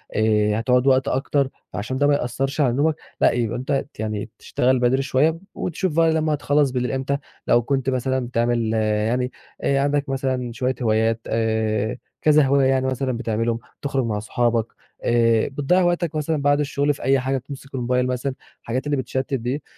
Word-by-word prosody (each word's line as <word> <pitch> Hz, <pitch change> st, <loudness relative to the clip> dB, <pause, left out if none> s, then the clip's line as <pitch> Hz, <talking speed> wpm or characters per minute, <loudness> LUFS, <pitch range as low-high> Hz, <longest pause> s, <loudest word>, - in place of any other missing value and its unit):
آآ، 105 Hz, 0 st, +2 dB
هتُقعد 125 Hz, +3 st, +2 dB
وقت 130 Hz, +1 st, +4 dB
أكتر 135 Hz, 0 st, 0 dB, 0.2 s
عشان 130 Hz, +6 st, -3 dB
ده 145 Hz, +1 st, +3 dB
ما 145 Hz, -, +4 dB
يأثّرش 135 Hz, +2 st, -1 dB
على 125 Hz, -4 st, +3 dB
نومك، 150 Hz, +3 st, +2 dB, 0.3 s
لأ -, -, +6 dB
يبقى 120 Hz, 0 st, -1 dB
أنت 130 Hz, +3 st, -4 dB, 0.2 s
ت -, -, -24 dB
يعني 110 Hz, 0 st, -3 dB
تشتغل 130 Hz, +1 st, +1 dB
بدري 125 Hz, +2 st, +2 dB
شوية 145 Hz, +4 st, +1 dB, 0.2 s
وتشوف 180 Hz, -1 st, -2 dB
بقى 165 Hz, -1 st, +4 dB
لما 155 Hz, -1 st, +1 dB
تخلّص 145 Hz, -1 st, +2 dB
بالليل 125 Hz, -1 st, -1 dB
إمتى 135 Hz, +1 st, -1 dB, 0.3 s
لو 120 Hz, -, +5 dB
كنت 135 Hz, +1 st, -1 dB
مثلًا 130 Hz, 0 st, -1 dB
بتعمل 115 Hz, -2 st, 0 dB
يعني 110 Hz, +3 st, 0 dB, 0.3 s
آآ، 140 Hz, 0 st, +2 dB
عندك 145 Hz, 0 st, 0 dB
مثلًا 130 Hz, -2 st, -1 dB
شوية 130 Hz, +1 st, -1 dB
هوايات 110 Hz, 0 st, +2 dB
آآ، 110 Hz, 0 st, 0 dB, 0.2 s
كذا 150 Hz, -1 st, +5 dB
هواية 135 Hz, 0 st, +3 dB
يعني 130 Hz, 0 st, +2 dB
مثلًا 130 Hz, -2 st, -1 dB
بتعملهم، 115 Hz, 0 st, -1 dB, 0.2 s
تُخرج 135 Hz, -3 st, -1 dB
مع 105 Hz, -2 st, -1 dB
صُحابك 115 Hz, +1 st, 0 dB, 0.4 s
آآ، 115 Hz, -2 st, +3 dB
بتضيَّع 145 Hz, +7 st, +1 dB
وقتك 175 Hz, -2 st, 0 dB
مثلًا 155 Hz, 0 st, -1 dB
بعد 145 Hz, +1 st, +3 dB
الشغل 145 Hz, 0 st, +1 dB
في -, -, -10 dB
أي 135 Hz, 0 st, +3 dB
حاجة، 135 Hz, +1 st, -1 dB
بتمسك 135 Hz, +1 st, -9 dB
الموبايل 125 Hz, 0 st, 0 dB
مثلًا، 130 Hz, +1 st, -2 dB, 0.3 s
الحاجات 130 Hz, +4 st, -3 dB
اللي 145 Hz, -1 st, 0 dB
بتشتِّت 130 Hz, +2 st, -3 dB
دي، 130 Hz, +3 st, -2 dB
130 Hz, 180 wpm, -22 LUFS, 120-140 Hz, 0.4 s, لأ